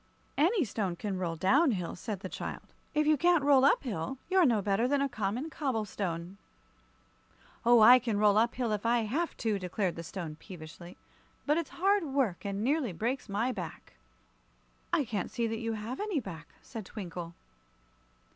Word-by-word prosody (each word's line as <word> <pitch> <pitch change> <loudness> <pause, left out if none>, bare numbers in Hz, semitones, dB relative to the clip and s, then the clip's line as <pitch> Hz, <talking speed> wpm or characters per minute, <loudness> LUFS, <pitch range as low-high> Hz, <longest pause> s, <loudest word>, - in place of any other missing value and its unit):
"Any 345 - +3
stone 200 -4 -2
can 195 0 -4
roll 170 -3 -2
down 265 - +4
hill," 180 -4 -3
said 200 0 -5
the 185 - -4
child. - - -6 0.3
"If 300 0 +3
you 305 0 +4
can't 345 0 +3
roll 280 -2 +5
up 280 - +4
hill, 225 - -3
you're 370 -4 +5
no 230 -4 +3
better 200 +4 +1
than 285 +1 +2
a 280 - +2
common 245 +5 -3
cobble 260 -9 -1
stone." 180 -1 -4 1.2
"Oh, 240 -1 +6
I 245 +4 +9
can 230 -4 -1
roll 205 -1 +4
up 235 +1 +1
hill 245 -3 -1
if 210 -1 -1
I 235 +1 +3
have 285 +11 -2
to," 215 -4 0
declared 185 0 -2
the 165 - -5
Stone, 165 -2 -6
peevishly. 170 -1 -11 0.5
"But 300 +2 +2
it's 335 - -4
hard 390 +2 +2
work, 265 - -1
and 200 +1 -2
nearly 270 - +1
breaks 235 +7 -2
my 220 +6 0
back." - - -7 1.0
"I 335 -5 +2
can't 210 -5 -3
see 235 - -1
that 225 0 -2
you 230 -1 -2
have 220 +4 -5
any 415 -7 -1
back," 165 - -8 0.2
said 225 -3 -7
Twinkle. 175 -4 -7
225 Hz, 185 wpm, -30 LUFS, 195-275 Hz, 1.2 s, I